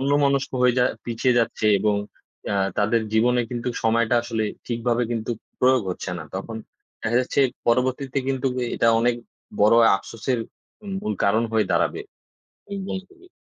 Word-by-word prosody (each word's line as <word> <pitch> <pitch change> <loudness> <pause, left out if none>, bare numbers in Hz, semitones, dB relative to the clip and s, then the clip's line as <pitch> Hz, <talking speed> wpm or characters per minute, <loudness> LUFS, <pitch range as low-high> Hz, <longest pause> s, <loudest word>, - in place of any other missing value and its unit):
অন্যমনস্ক 140 0 +2
হয়ে 125 -1 +4
যা 125 - +4 0.2
পিছিয়ে 120 +1 +1
যাচ্ছে 115 -2 0
এবং 105 +1 +2 0.5
অ্যা 100 - 0 0.2
তাদের 110 +3 +2
জীবনে 120 +3 +3
কিন্তুক 120 0 -3
সময়টা 115 +1 +2
আসলে 115 -2 -2 0.2
ঠিকভাবে 120 0 0
কিন্তুক 115 0 -2 0.2
প্রয়োগ 130 -1 +4
হচ্ছে 90 - -5
না। - - -6
তখন 105 +4 -5 0.5
দেখা 115 +2 0
যাচ্ছে 130 +2 0 0.3
পরবর্তীতে 130 +3 +1
কিন্তুক 135 -1 0 0.2
এটা 115 - +2
অনেক 120 +1 +2 0.5
বড় 105 +3 +6 0.2
আফসোসের 115 +5 -3 0.6
মূল 105 - -2
কারণ 110 +3 +3
হয়ে 110 -1 +3
দাঁড়াবে। - - +1 0.7
একদম 195 -1 -4
খুবি 370 0 -20
120 Hz, 145 wpm, -23 LUFS, 110-130 Hz, 0.7 s, বড়